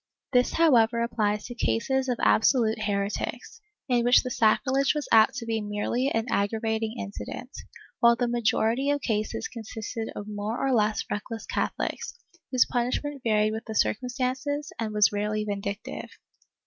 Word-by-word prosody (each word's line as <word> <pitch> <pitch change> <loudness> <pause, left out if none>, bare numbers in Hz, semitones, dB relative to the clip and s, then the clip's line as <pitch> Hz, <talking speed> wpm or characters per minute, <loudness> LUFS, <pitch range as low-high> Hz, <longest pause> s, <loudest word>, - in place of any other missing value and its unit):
^ - - -64
This 250 0 +3
however 235 -8 +4
applies 210 -3 -1
to 245 - -6
cases 255 - 0
of 245 - 0
absolute 220 -1 +3
heretics, 205 - -3 0.3
in 245 -3 +2
which 245 +1 +5
the 255 - -4
sacrilege 265 +6 +2
was 300 - -3
apt 220 +2 +6
to 245 -4 -5
be 225 -1 -1
merely 210 +5 -1
an 225 -4 -1
aggravating 220 +1 -1
incident, 230 +4 -7 0.5
while 235 0 +6
the 245 - 0
great 240 - -2
majority 235 +3 +1
of 290 0 +1
cases 215 -3 -2
consisted 225 0 -6
of 205 - -6
more 210 +2 -3
or 270 -1 +1
less 215 -2 +2
reckless 225 +2 -4
Catholics, - - -3 0.3
whose 255 -2 +4
punishment 260 +3 -2
varied 215 -1 +2
with 220 +1 -5
the 220 - -6
circumstances 260 +6 -1
and 220 -2 -2
was 210 -1 +4
rarely 210 +1 -1
vindictive. 200 0 -5
225 Hz, 160 wpm, -27 LUFS, 215-250 Hz, 0.5 s, apt